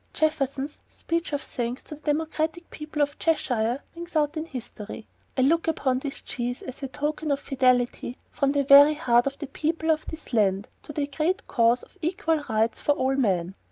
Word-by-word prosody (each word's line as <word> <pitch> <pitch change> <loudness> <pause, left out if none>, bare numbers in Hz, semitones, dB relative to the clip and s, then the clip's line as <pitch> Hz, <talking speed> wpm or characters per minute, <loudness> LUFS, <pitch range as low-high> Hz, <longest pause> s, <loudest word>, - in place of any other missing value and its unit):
Jefferson's 285 -2 -1
speech 335 +1 -3
of 290 -1 -2
thanks 245 +1 -3
to - - -9
the 300 - -11
democratic 320 +2 -1
people 300 -1 -2
of 285 0 -3
Cheshire 250 -6 +1
rings 340 0 -8
out 300 0 +2
in 310 0 -3
history: 235 -6 -8 0.3
"I - - +3
look 330 +6 +3
upon 265 -5 +1
this 275 0 -5
cheese 245 0 -3
as 260 - -8
a 270 - -2
token 300 +3 -3
of 280 -1 +1
fidelity 250 -2 +1
from 275 -1 +1
the 285 -1 +2
very 285 +2 +8
heart 245 -5 +3
of 275 0 -3
the 295 - -5
people 320 +3 0
of 315 0 -1
this 320 -5 -8
land 200 -3 +2
to - - -9
the 290 -1 -1
great 315 +6 -1
cause 235 +1 +3
of - - -18
equal 325 -2 0
rights 220 +1 +1
to 290 - +5
all 265 -1 +1
men." 190 -8 +1
280 Hz, 195 wpm, -26 LUFS, 245-310 Hz, 0.3 s, very